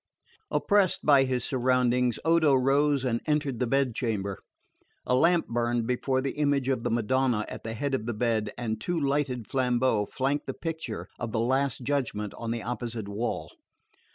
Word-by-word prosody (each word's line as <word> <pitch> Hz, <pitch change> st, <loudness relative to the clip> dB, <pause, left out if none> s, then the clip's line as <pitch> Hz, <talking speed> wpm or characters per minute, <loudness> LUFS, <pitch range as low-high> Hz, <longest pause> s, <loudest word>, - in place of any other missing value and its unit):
Oppressed 205 Hz, -3 st, +2 dB
by 140 Hz, -3 st, +6 dB
his 125 Hz, -2 st, -1 dB
surroundings, 125 Hz, -1 st, +2 dB
Odo 160 Hz, -4 st, +4 dB
rose 135 Hz, +1 st, +2 dB
and 120 Hz, -2 st, 0 dB
entered 145 Hz, -5 st, 0 dB
the 125 Hz, -, 0 dB
bed 135 Hz, -1 st, +1 dB
chamber. 100 Hz, -6 st, -2 dB, 0.7 s
A -, -, +1 dB
lamp 165 Hz, +6 st, +3 dB
burned 120 Hz, 0 st, 0 dB
before 130 Hz, +2 st, 0 dB
the 135 Hz, +2 st, -4 dB
image 140 Hz, -3 st, +1 dB
of 130 Hz, -3 st, 0 dB
the -, -, -1 dB
Madonna 120 Hz, 0 st, +1 dB
at -, -, -8 dB
the 115 Hz, 0 st, -5 dB
head 140 Hz, +4 st, -2 dB
of 120 Hz, -4 st, -1 dB
the 120 Hz, -, -1 dB
bed, 110 Hz, -2 st, 0 dB
and 110 Hz, -3 st, -3 dB
two 175 Hz, +5 st, -1 dB
lighted 135 Hz, -5 st, -1 dB
flambeaux 125 Hz, -4 st, +1 dB
flanked 140 Hz, +2 st, -1 dB
the -, -, -4 dB
picture 165 Hz, -1 st, -5 dB
of 115 Hz, -2 st, -4 dB
the 110 Hz, -, +1 dB
Last 130 Hz, +3 st, +1 dB
Judgment 120 Hz, -7 st, -2 dB
on 115 Hz, -, -6 dB
the 115 Hz, -1 st, -2 dB
opposite 120 Hz, -3 st, -4 dB
wall. 100 Hz, -7 st, -3 dB
125 Hz, 175 wpm, -27 LUFS, 115-140 Hz, 0.7 s, by